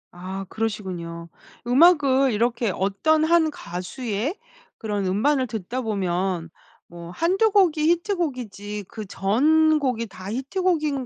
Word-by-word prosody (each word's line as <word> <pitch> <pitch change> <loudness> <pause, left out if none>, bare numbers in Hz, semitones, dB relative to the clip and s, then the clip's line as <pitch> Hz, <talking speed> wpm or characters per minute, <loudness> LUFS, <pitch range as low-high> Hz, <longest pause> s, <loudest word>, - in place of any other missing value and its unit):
아 190 +2 -6
그러시군요. 180 -6 -4 0.4
음악을 275 -1 +4
이렇게 235 +1 0
어떤 200 - +1
1 325 0 +3
가수의 225 - -4 0.4
그런 205 -3 -3
음반을 255 +8 +1
듣다 225 +3 -4
보면 185 -5 -2 0.4
뭐 170 0 -10
한두 375 - +2
곡이 370 -6 +3
히트곡이지 255 - -2
그 215 -2 -7
전곡이 265 +4 +2
다 190 -1 -9
히트곡인 300 - -1
235 Hz, 245 characters per minute, -23 LUFS, 195-310 Hz, 0.4 s, 음악을